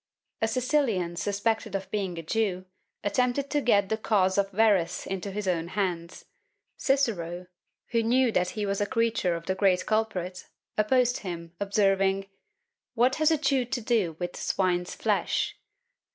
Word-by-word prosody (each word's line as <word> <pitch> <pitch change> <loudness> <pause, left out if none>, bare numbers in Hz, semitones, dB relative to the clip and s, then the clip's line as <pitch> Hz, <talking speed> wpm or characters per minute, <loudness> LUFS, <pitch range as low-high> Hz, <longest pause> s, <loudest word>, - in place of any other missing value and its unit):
A 225 - +3
Sicilian 235 - 0
suspected 205 +3 -1
of 195 0 -4
being 195 -5 -2
a 165 - -5
Jew, 185 0 -1 0.4
attempted 250 +6 0
to 295 - +1
get 200 -6 +3
the 220 - 0
cause 195 -3 +2
of 195 0 +1
Verres 200 -4 +2
into 195 +1 -4
his 200 0 -4
own 170 -2 0
hands; 180 -3 -3 0.5
Cicero, 185 - 0 0.5
who 230 -1 +2
knew 245 +2 +3
that 180 -3 +1
he 210 - 0
was 200 0 -1
a 205 - +1
creature 230 -7 +1
of 170 0 -7
the 190 - 0
great 190 -1 +2
culprit, 185 -5 -2 0.3
opposed 245 +3 +2
him, 170 -3 -7
observing 195 -1 +2 0.7
"What 250 +3 +3
has 310 0 +4
a 320 - +3
Jew 270 -3 +2
to 250 +1 -2
do 215 -8 0
with 175 0 -4
swine's 180 -2 0
flesh?" - - 0
200 Hz, 155 wpm, -27 LUFS, 185-230 Hz, 0.7 s, has